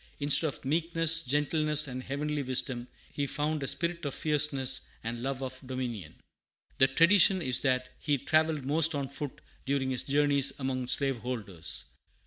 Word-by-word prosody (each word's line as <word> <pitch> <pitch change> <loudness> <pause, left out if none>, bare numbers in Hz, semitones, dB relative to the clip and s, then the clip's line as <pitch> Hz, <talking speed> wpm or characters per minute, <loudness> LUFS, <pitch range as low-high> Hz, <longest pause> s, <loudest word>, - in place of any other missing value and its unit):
Instead 145 +2 +4
of 140 - -6
meekness, 165 +2 +2
gentleness, 150 +2 +1
and 130 -1 -5
heavenly 145 +3 -3
wisdom, 125 -2 -1 0.3
he 145 -1 -2
found 150 +2 -2
"a 135 - -3
spirit 170 +5 -1
of 145 -3 -3
fierceness 140 -4 +1 0.2
and 115 +1 -4
love 135 +1 -3
of 130 0 -6
dominion." 125 - -5 0.6
[The 135 - +6
tradition 180 +7 +5
is 130 -7 0
that 130 -2 0
he 145 -2 0
travelled 155 +1 +1
mostly 155 +1 +3
on 135 -1 -4
foot 140 -1 -7 0.2
during 135 -1 -1
his 130 - 0
journeys 140 -1 +2
among 130 -2 -2
slaveholders. 120 - -2
140 Hz, 150 wpm, -29 LUFS, 130-150 Hz, 0.6 s, The